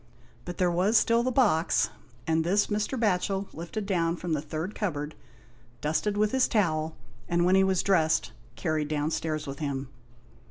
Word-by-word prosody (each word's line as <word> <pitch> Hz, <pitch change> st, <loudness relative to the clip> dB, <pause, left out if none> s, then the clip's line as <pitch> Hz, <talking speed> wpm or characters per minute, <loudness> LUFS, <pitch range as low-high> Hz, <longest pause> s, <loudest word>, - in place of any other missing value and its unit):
But 175 Hz, -1 st, -6 dB
there 180 Hz, -1 st, +2 dB
*was 190 Hz, +6 st, +3 dB
still 230 Hz, +2 st, +3 dB
the 255 Hz, +2 st, 0 dB
box, 205 Hz, -11 st, +2 dB, 0.3 s
and 160 Hz, 0 st, +1 dB
this 195 Hz, +5 st, +2 dB
Mr. 215 Hz, +5 st, -1 dB
Batchel 195 Hz, -2 st, 0 dB
lifted 175 Hz, +6 st, -5 dB
down 170 Hz, -4 st, +1 dB
from 175 Hz, -1 st, -3 dB
the 150 Hz, -, 0 dB
third 160 Hz, +6 st, -4 dB
cupboard, 150 Hz, -7 st, -3 dB, 0.7 s
dusted 160 Hz, -, -1 dB
with 210 Hz, 0 st, +2 dB
his 265 Hz, -1 st, +3 dB
towel, 160 Hz, -7 st, 0 dB, 0.3 s
and 175 Hz, 0 st, +2 dB
when 180 Hz, -, +4 dB
he 190 Hz, 0 st, +5 dB
was 190 Hz, -1 st, +2 dB
dressed, 160 Hz, -5 st, +2 dB, 0.2 s
carried 155 Hz, -3 st, -1 dB
downstairs 155 Hz, 0 st, -2 dB
with 140 Hz, -1 st, -6 dB
him. 140 Hz, -3 st, -3 dB
175 Hz, 165 wpm, -28 LUFS, 155-205 Hz, 0.7 s, he